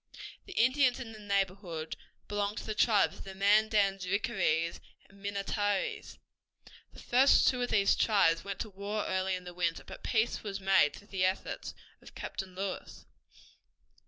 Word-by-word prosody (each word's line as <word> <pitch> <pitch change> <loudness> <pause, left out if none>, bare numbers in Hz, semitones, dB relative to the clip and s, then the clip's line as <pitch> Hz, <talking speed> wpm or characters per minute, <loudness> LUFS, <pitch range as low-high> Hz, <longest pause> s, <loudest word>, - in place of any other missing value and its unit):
The 385 - -8
Indians 255 0 +3
in 240 -4 -7
the 215 - -11
neighborhood 195 -5 -2 0.3
belonged 205 0 -2
to - - -5
the 215 - -2
tribes 210 -1 +3
of - - -8
the 190 -1 -9
Mandans, 200 -1 +3
Rickarees, 180 -5 0 0.3
and 195 0 -20
Minnetarees. 200 0 -2 0.7
The - - -14
first 260 +3 +4
two 250 -1 +2
of 245 - -1
these 200 -2 +3
tribes 165 -7 +3
went 200 -1 -5
to 220 - -4
war 200 +2 -3
early 190 0 0
in 180 - -7
the 180 0 -9
winter, 170 -2 -1
but - - -11
peace 225 0 0
was 200 -2 -5
made 190 -6 +3
through 205 - -15
the 190 -2 -1
efforts 185 +1 -3 0.3
of - - -15
Captain 185 -1 -6
Lewis. 195 0 -5
200 Hz, 160 wpm, -31 LUFS, 190-215 Hz, 0.7 s, first